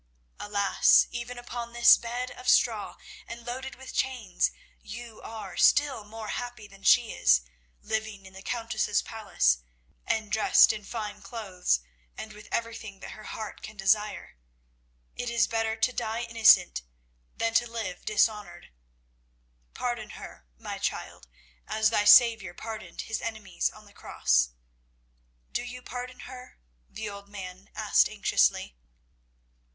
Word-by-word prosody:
Alas, 200 -1 +4
even 240 +1 -5
upon 240 -1 -6
this 240 0 +8
bed 245 +2 -4
of 250 0 -4
straw, 225 -5 +3 0.3
and 235 0 -9
loaded 260 +2 -5
with 265 +1 -10
chains, 250 -8 0 0.3
you 235 - -9
are 215 -5 -8
still 285 -7 +4
more 215 +1 -8
happy 245 -3 -5
than 195 -1 -17
she 230 +3 +5
is, 60 0 +4 0.4
living 220 -3 -3
in 190 - -13
the 190 - -10
Countess's 225 -2 -1
palace 205 - +1 0.5
and 215 -2 -1
dressed 220 0 +6
in 210 -1 -7
fine 210 -1 -6
clothes, 190 - -1 0.4
and 215 -1 -7
with 210 0 -13
everything 225 -4 -4
that - - -9
her 215 - -11
heart 215 -1 -7
can 215 - -10
desire. 210 - 0 0.8
It 245 - -3
is 235 -1 +3
better 225 -1 -1
to 225 +3 +1
die 225 +1 -2
innocent 225 - +5 0.6
than 230 0 0
to 235 +1 +2
live 215 -6 -5
dishonoured. 210 - 0 1.0
Pardon - - -3
her, - - -11
my - - -6
child, 60 - -4 0.4
as 220 0 +2
thy 210 -2 +2
Saviour 220 -6 +7
pardoned 220 -1 -7
His 225 - -4
enemies 220 -3 -2
on 215 0 -15
the 205 - -18
cross. - - +1 1.0
Do - - -1
you 245 +1 -8
pardon 250 +1 -7
her?" 255 -1 -11 0.3
the 220 - -6
old 200 0 -9
man 190 -2 -9
asked - - +3
anxiously. 65 - +1
220 Hz, 140 wpm, -28 LUFS, 200-235 Hz, 1.0 s, this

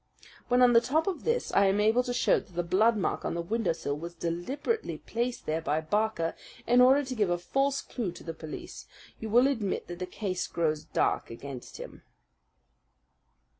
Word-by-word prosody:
When 250 0 +4
on 245 -1 +6
the 230 - +7
top 300 +7 +1
of 380 -5 -3
this 470 +1 0
I 200 - +5
am 195 +2 +2
able 220 +4 +4
to 250 0 -4
show 245 - +3
that 180 - -17
the 175 - 0
blood 215 +6 +3
mark 195 - -1
on - - -2
the 170 - -1
windowsill 170 -7 -1
was 170 +3 -7
deliberately 215 - -2
placed 240 +1 -3
there 160 +1 -1
by 155 -1 0
Barker, 165 0 0 0.3
in 245 +1 +5
order 265 +3 +6
to 260 - -4
give 210 -6 +1
a 175 - +1
false 270 +10 0
clue 225 -8 -4
to - - -12
the 165 - -5
police, 155 -1 -8 0.3
you 220 - -5
will 240 +4 +5
admit 225 -8 -1
that 175 0 -6
the 180 - -3
case 185 -1 -3
grows 155 -2 -1
dark 155 - 0
against 125 +2 -8
him. - - -9
205 Hz, 195 wpm, -29 LUFS, 170-250 Hz, 0.3 s, the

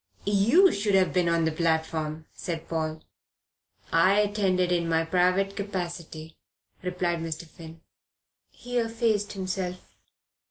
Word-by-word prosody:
"You 230 - +5
should 200 0 0
have 190 -1 +3
been 180 -2 +2
on 165 -1 +2
the 160 - +1
platform," 160 -1 -1
said 165 -2 -5
Paul. 160 -1 -3 0.9
"I 185 +5 +4
attended 195 -4 +1
in 170 -1 +1
my 165 0 +2
private 185 +3 +2
capacity," 170 -5 -6 0.4
replied 180 -2 -1
Mr. 165 0 -5
Finn. 160 0 -13 0.7
He 245 0 -3
effaced 225 -3 0
himself. 185 -2 -4
180 Hz, 120 wpm, -27 LUFS, 165-200 Hz, 0.9 s, You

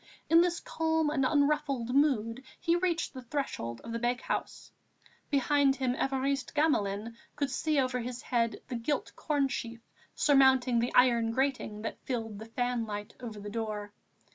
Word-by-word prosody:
In 330 +1 +8
this 345 -1 +1
calm 320 -1 0
and 275 -3 +1
unruffled 285 -4 +1
mood 260 -4 +2 0.2
he 335 - +2
reached 345 -2 0
the 260 - -7
threshold 235 - -4
of 230 - -8
the 230 - -2
bakehouse. 245 +1 -2 0.6
Behind 280 -1 +3
him, 260 -2 0
Évariste 270 +2 -1
Gamelin 230 -7 +1 0.2
could 285 -2 -1
see 310 -2 +1
over 255 -1 0
his 245 +1 -5
head 235 -2 0
the 250 - -3
gilt 260 +5 -2
cornsheaf 270 -6 -1 0.4
surmounting 265 -4 +4
the 240 +1 0
iron 235 -2 +5
grating 250 -4 -1
that 225 - -5
filled 225 -5 -3
the 220 - -8
fanlight 225 -3 -2
over 225 -4 -7
the 205 - -8
door. 210 -2 -4
255 Hz, 150 wpm, -30 LUFS, 230-285 Hz, 0.6 s, In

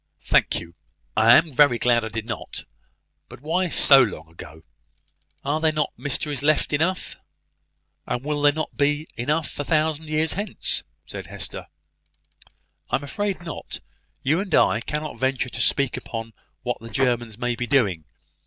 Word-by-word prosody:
"Thank - - +2
you: 85 0 -11 0.4
I 115 +2 +7
am 160 -1 +2
very 130 -2 +5
glad 120 -1 +3
I - - -2
did 110 0 -5
not. 115 - -6 0.7
But - - -11
why 175 +5 0
so 135 -3 +7
long 100 -8 -2
ago? 80 -1 -12 0.8
Are 150 +3 0
there 160 -1 +4
not 155 -1 -1
mysteries 145 0 -3
enough 150 +1 +2
left?" 170 +5 0 0.9
"And 125 - -2
will 150 0 -2
there 145 0 +6
not 155 +2 -4
be 145 +2 +1
enough 150 +7 -2
a - - 0
thousand 155 0 0
years 155 +1 +1
hence?" 200 +1 -1 0.2
said - - -8
Hester. - - -6 1.2
"I - - +2
am 145 - -2
afraid 200 +4 -3
not. 165 - -7 0.4
You 150 +6 +2
and 190 -4 0
I 110 - +4
cannot 150 +3 -4
venture 130 -1 0
to - - -4
speak 140 -3 +2
upon 115 -1 -6 0.3
what - - -2
the 115 - -9
Germans 120 -4 0
may 120 0 -1
be 120 0 -3
doing. 100 - +2
145 Hz, 160 wpm, -24 LUFS, 120-155 Hz, 1.2 s, I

